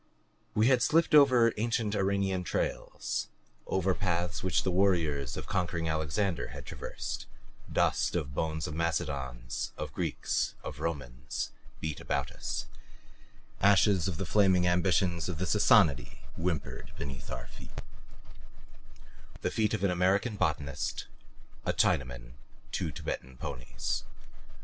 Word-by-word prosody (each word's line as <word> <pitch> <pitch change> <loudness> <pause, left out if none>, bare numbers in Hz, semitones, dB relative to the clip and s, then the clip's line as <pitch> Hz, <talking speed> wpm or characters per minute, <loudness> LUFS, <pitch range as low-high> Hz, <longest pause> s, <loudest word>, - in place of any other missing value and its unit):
We 110 - +4
had 130 -1 +5
slipped 165 +6 +3
over 130 -6 +7
ancient 115 -1 0
Iranian 95 -2 +1
trails; - - -2 0.4
over 95 0 +2
paths 90 -2 -1
which 95 - +1
the 95 - +1
warriors 80 -8 +2
of - - -5
conquering 85 -2 -1
Alexander 80 +3 0
had - - -9
traversed; - - -5 0.4
dust - - +2
of 75 -6 -2
bones 80 +1 -1
of 75 - -4
Macedons, 70 -7 -2
of - - -5
Greeks, - - -1
of - - -6
Romans, 65 -5 -3 0.3
beat 80 -2 -3
about - - -1
us; - - -4 1.0
ashes 100 -2 +5
of 90 -5 -2
the 95 - -2
flaming 95 0 +4
ambitions 90 -1 +2
of 85 - -3
the 95 - -1
Sassanidae 100 -6 +4 0.2
whimpered 80 -4 -3
beneath 65 -3 -6
our 60 +1 -5
feet 60 0 -10 1.6
the - - 0
feet 110 0 +2
of 105 - -4
an 100 - +3
American 95 +6 +2
botanist, 75 -7 -1 0.6
a - - 0
Chinaman, 60 -2 +1 0.4
two - - -1
Tibetan 65 0 -5
ponies. 60 -1 -3
90 Hz, 125 wpm, -31 LUFS, 75-100 Hz, 1.6 s, over